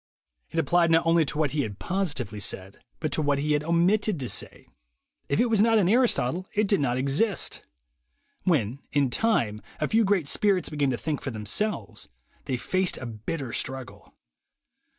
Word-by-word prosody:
It - - -7
applied 170 +2 +3
not 165 0 +4
only 165 -1 +4
to 145 - -4
what 150 -3 +1
he 150 - 0
had 105 -6 -4
positively 145 - -2
said, 95 0 -4 0.2
but 155 -2 -2
to 155 - +1
what 145 -1 +1
he 150 +2 -1
had 150 0 +2
omitted 175 +4 +2
to 125 - -3
say. - - -3 0.6
If 140 - +1
it - - +4
was 225 -4 +2
not 225 0 +4
in 195 -5 +3
Aristotle, 185 - +2
it 210 0 +2
did 200 -2 +3
not 125 -3 0
exist. 145 - 0 0.8
When, 135 - +1
in 140 -3 +2
time, 120 - +1 0.2
a 150 - 0
few 225 +1 +3
great 195 -7 +1
spirits 195 +2 +1
began 145 -3 0
to 125 - -1
think 150 +1 -3
for - - -4
them 110 -4 -6
selves, 110 - -2 0.4
they 130 - -1
faced 185 +8 -1
a 130 - -7
bitter 120 +4 -5
struggle. 130 -1 -4
150 Hz, 185 wpm, -26 LUFS, 130-190 Hz, 0.8 s, not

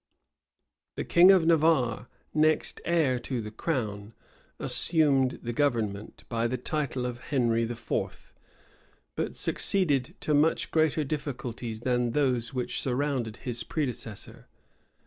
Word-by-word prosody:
The - - -3
king 175 +2 +6
of 190 -4 +6
Navarre, 155 -8 +2 0.3
next 155 0 +2
heir 155 -7 +2
to 125 +1 -4
the 105 -1 -6
crown, 110 -5 -3 0.4
assumed 140 -6 +2
the 120 0 -3
government, 115 -7 -1
by 115 0 -1
the 130 +2 -2
title 135 -5 -2
of 120 -1 -4
Henry 120 -5 +1
IV.; 115 0 -4 0.8
but - - -3
succeeded 145 -10 +1
to 150 - 0
much 150 +3 +2
greater 155 -1 +2
difficulties 125 -6 -5
than 120 -1 0
those 125 -5 +1
which 125 -2 -3
surrounded 130 -4 -2
his 120 -2 -1
predecessor. 120 -9 -4
130 Hz, 120 wpm, -28 LUFS, 115-150 Hz, 0.8 s, king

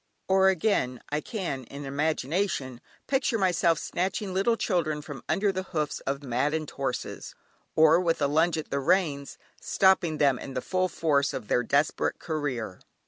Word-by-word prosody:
Or 190 0 +5
again, 160 - +1
I 150 +1 0
can 175 - -4
in 140 +4 -8
imagination 140 -1 -1 0.2
picture 265 -3 +1
myself 175 -4 +2
snatching 190 +4 -2
little 200 +5 +2
children 155 -8 -1
from 145 -3 -8
under 200 0 +2
the 185 0 -3
hoofs 155 -6 -3
of 140 +1 -2
maddened 145 +5 -1
horses, 135 -2 -4 0.4
or 160 +1 +6
with 170 -2 +1
a - - +2
plunge 160 +4 +2
at 155 - -6
the 140 - 0
reins, 145 -3 0 0.2
stopping 190 -5 +3
them 140 -4 +3
in 135 - -8
the - - 0
full 185 +4 0
force 145 -4 +1
of 105 - -6
their 125 - +3
desperate 140 +5 +1
career. 130 - -3
155 Hz, 160 wpm, -27 LUFS, 140-185 Hz, 0.4 s, or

